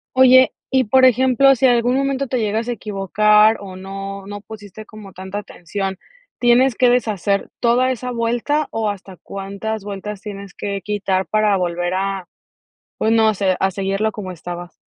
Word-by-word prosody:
Oye, 260 0 +6 0.2
y 265 -1 +3
por 260 +3 +4
ejemplo, 260 +2 +4
si 265 - +1
en 255 - +6
algún 240 +1 +2
momento 275 0 -1
te 255 - -1
llegas 220 0 -1
a 245 - -1
equivocar, 210 +1 +3
o 195 -2 -9
no 195 +1 -7
no 205 0 -7
pusiste 215 -1 -11
como 210 -2 -12
tanta 190 +2 -6
atención, 195 0 -5 0.4
¿tienes 245 +1 +3
que 250 +1 +4
deshacer 205 -5 0
toda 245 +2 +2
esa 250 0 -3
vuelta, 240 +6 -1
o 220 -1 -1
hasta 195 -2 -11
cuántas 200 +3 -6
vueltas 200 0 -6
tienes 200 -3 -8
que 200 -1 -4
quitar 195 -2 -1
para 215 -2 +2
volver 175 0 -2
a 195 -1 -2 0.7
pues 220 - 0
no 220 -1 +4
sé, 190 -2 0
a 190 0 +1
seguirlo 195 +3 -1
como 195 -3 -7
estabas? 175 0 -8
210 Hz, 170 wpm, -19 LUFS, 195-240 Hz, 0.7 s, Oye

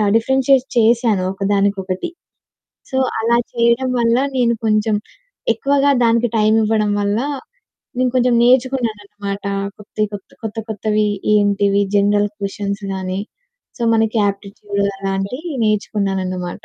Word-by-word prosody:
Differentiate 265 +2 +3
చేశాను 225 -4 +3
ఒకదానికొకటి. 195 - -1 0.8
So, 260 - -2 0.2
అలా 235 +1 +3 0.2
చేయడం 235 +2 +2
వల్ల 230 0 +3 0.2
నేను 235 -1 +3
కొంచెం 215 0 +2 0.6
ఎక్కువగా 280 +4 +2
దానికి 235 +1 +3
టైమివ్వడం 215 0 +2
వల్ల 205 +2 0 0.8
నేను 255 0 +2
కొంచెం 250 -1 +3
నేర్చుకున్నానన్నమాట. 215 -6 0 0.3
కొత్తే 210 +1 -7
కొత్త, 200 - -8
కొత్త 220 +1 -5
కొత్తవి 215 0 0 0.3
ఏంటివి 200 -1 +2
జనరల్ 205 +1 +3
క్వెషన్స్ 200 0 -4
గాని. 190 +1 -3 0.6
సో, - - -1
మనకి 220 0 +1
యాప్టిట్యూడ్ 200 0 -4 0.2
అలాంటివి 195 - -3
నేర్చుకున్నానన్నమాట. 190 -4 -1
215 Hz, 105 wpm, -18 LUFS, 200-235 Hz, 0.8 s, Differentiate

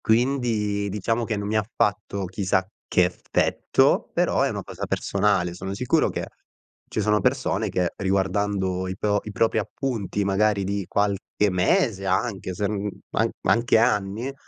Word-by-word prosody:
Quindi, 110 -4 +1
diciamo 115 +4 -1
che 110 -2 -2
non 100 0 -3
mi 110 - -1
ha 110 - +3
fatto 100 -1 0
chissà 95 0 0 0.2
che 90 - +4
effetto, 90 0 +1
però - - +1
è - - +3
una - - -4
cosa - - -6
personale. 95 -4 +1
Sono 95 +2 -5
sicuro 125 +3 +2
che, - - -3 0.6
ci 110 - -1
sono 105 +1 +2
persone 110 -5 0
che 90 -2 0
riguardando 95 -1 0
i 95 - -5
pro 105 -1 +1
i 105 - -5
propri 110 +2 +2
appunti, 105 -3 -2
magari 100 +1 +2
di 100 0 -2
qualche 100 0 0
mese 95 - +1
anche, 95 0 -1
se 105 - -1
n 105 0 -2 0.2
a - - +1
ma - - +2
anche 115 0 +4
anni, 110 +2 +1
100 Hz, 160 wpm, -24 LUFS, 95-110 Hz, 0.6 s, che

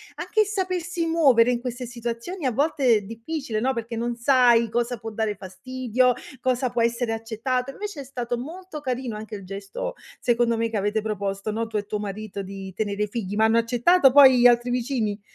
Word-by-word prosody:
anche - - -2
il - - +3
sapersi 365 -4 -2
muovere 270 -8 +4
in 240 - 0
queste 250 0 -5
situazioni 240 +8 -5
a 255 - +2
volte 285 +2 0
è 210 - +1
difficile, 230 +3 -4
no, 260 +4 +1
perché 230 -1 -5
non 235 +1 -2
sai 235 -2 +4
cosa 240 +2 -1
può 225 +1 -7
dare 215 -1 -1
fastidio 250 +6 0 0.3
cosa 255 0 0
può 240 -1 0
essere 235 0 0
accettato. 230 +3 -2
Invece 405 0 -6
è - - -7
stato 245 -2 -3
molto 330 +4 -8
carino 255 -4 -3
anche 215 0 -7
il 195 -2 -9
gesto, 200 - -5 0.3
secondo 235 -1 +2
me, 230 0 0
che 225 - -2
avete 205 +2 0
proposto, 200 -1 -3
no, 225 +2 -2
tu 225 - -11
e 205 - -2
tuo 210 0 -3
marito 205 0 -5
di 195 0 -8
tenere 205 +1 -2
i - - -1
figli, 205 -2 -4
ma 220 - +3
hanno 225 +1 +3
accettato 245 +6 +4
poi 265 -3 +8
gli 245 - +8
altri 240 0 +3
vicini? 235 -4 -1
235 Hz, 205 wpm, -24 LUFS, 215-260 Hz, 0.3 s, poi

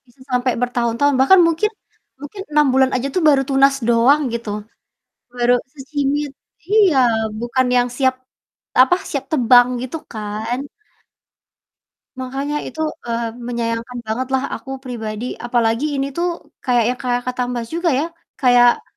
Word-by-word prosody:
Bisa 245 +2 -26
sampai 250 0 +1
bertahun-tahun 245 +3 +1
bahkan 315 +9 +6
mungkin 335 +6 +1 0.5
mungkin 295 +8 -8
6 265 -3 +4
aja 255 +2 -1
tuh 365 - +2
baru 280 -3 +5
tunas 275 0 +4
doang 240 +6 +4
gitu. 235 -2 -4 0.9
Baru 245 0 +3 0.2
secimit. 285 +1 -2 0.4
Iya, 410 -8 +4 0.4
bukan 240 +2 0
yang 245 0 +3
siap 260 -1 +2 0.7
apa, 265 +7 +3
siap 280 -2 -3
tebang 245 -3 +5
gitu 260 +5 -5 0.2
kan. 220 +3 -4 1.6
Makanya 270 +3 -3
itu, - - -10 0.3
eee, 230 -1 -2 0.2
menyayangkan 235 0 -3
bangetlah 260 +4 -2
aku 265 - -9
pribadi, 225 -3 -5
apalagi 240 +4 0
ini 275 0 -2
tuh 340 +5 -1 0.4
kayak 245 -3 +3
yang 250 - -7
kayak 245 -2 -1
kata 250 0 -2
Mbak 240 -2 -3
juga 340 +1 0
ya, 300 - 0 0.4
kayak, 245 -2 +5
255 Hz, 135 wpm, -19 LUFS, 240-280 Hz, 1.6 s, bahkan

